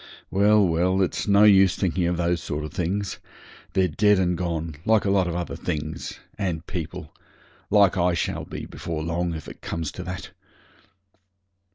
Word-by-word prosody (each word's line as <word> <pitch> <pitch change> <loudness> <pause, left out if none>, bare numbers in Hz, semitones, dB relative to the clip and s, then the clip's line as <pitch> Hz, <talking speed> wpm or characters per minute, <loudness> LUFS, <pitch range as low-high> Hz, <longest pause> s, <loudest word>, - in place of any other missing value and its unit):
Well, 100 +1 +4
well, 90 +3 +1
it's 90 - -2
no 100 0 +5
use 95 -3 +6
thinking 90 -2 0
of 90 0 0
those 85 0 0
sort 75 +1 -4
of 75 - -7
things. 95 +2 -2 0.5
They're 95 -1 +3
dead 105 +5 +3
and 90 -1 +1
gone, 85 -3 -3
like 110 0 +3
a 100 - +2
lot 95 -2 +3
of 85 - -3
other 85 -1 -3
things 75 +2 -4 0.2
and 85 -5 -2
people 85 -5 -6 0.6
like 100 -4 +4
I 90 -1 +2
shall - - -2
be - - -7
before 80 -2 -5
long, 85 +1 -1
if 80 - -8
it - - -11
comes 80 -3 -3
to 90 - -7
that. 90 -1 -6
90 Hz, 175 wpm, -24 LUFS, 85-95 Hz, 0.6 s, use